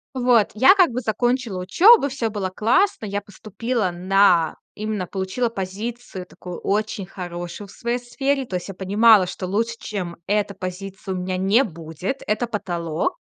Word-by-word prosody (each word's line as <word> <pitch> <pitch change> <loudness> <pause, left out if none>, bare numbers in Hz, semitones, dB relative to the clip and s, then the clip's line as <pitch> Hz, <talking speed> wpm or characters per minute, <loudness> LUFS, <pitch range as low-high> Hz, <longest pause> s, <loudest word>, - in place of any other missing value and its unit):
Вот, 245 -4 +3
я 260 - +6
как 365 -8 +4
бы 250 +2 -3
закончила 240 -1 -1
учёбу, 345 - +6
всё 255 -5 -2
было 205 -3 -3
классно. 235 - +2
Я 200 0 -2
поступила 210 +2 -3
на 180 -2 +3 0.2
именно 210 -3 -3
получила 190 +7 -2
позицию 205 0 -6
такую 180 -1 -9
очень 210 0 -1
хорошую 175 +1 -7
в - - -15
своей 235 +3 -2
сфере. 270 +3 -1
То 190 - -5
есть 175 - -8
я 195 - -6
понимала, 205 +2 +5
что 185 +1 -5
лучше, 225 +5 -1
чем 180 -5 -5
эта 205 0 0
позиция, 190 +1 -6
у - - -3
меня 185 0 -2
не 200 +7 +3
будет, 170 - -5
это 215 +3 0
потолок 175 - -2
205 Hz, 160 wpm, -22 LUFS, 185-235 Hz, 0.2 s, я